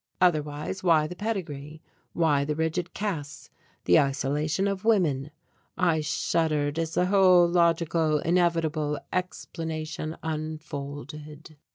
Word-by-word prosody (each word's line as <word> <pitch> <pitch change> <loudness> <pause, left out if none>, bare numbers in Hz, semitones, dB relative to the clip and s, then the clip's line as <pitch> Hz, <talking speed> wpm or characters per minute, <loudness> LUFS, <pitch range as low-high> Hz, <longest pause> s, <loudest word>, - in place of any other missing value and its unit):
Otherwise 155 0 0
why 165 -4 +4
the 175 +3 -6
pedigree, 160 -8 -4 0.3
why 150 -4 +2
the 150 +1 -2
rigid 160 +2 -1
castes, 160 -8 -4 0.3
the 90 - +6
isolation 145 +6 0
of 195 0 -2
women? 160 -11 +2 0.5
I 170 -4 +2
shuddered 150 -1 0
as 165 -1 -2
the 180 - +3
whole 185 -2 +5
logical, 170 -2 +2
inevitable 165 -3 +1 0.2
explanation 165 -3 -4
unfolded. 150 0 -6
160 Hz, 105 wpm, -27 LUFS, 150-175 Hz, 0.5 s, the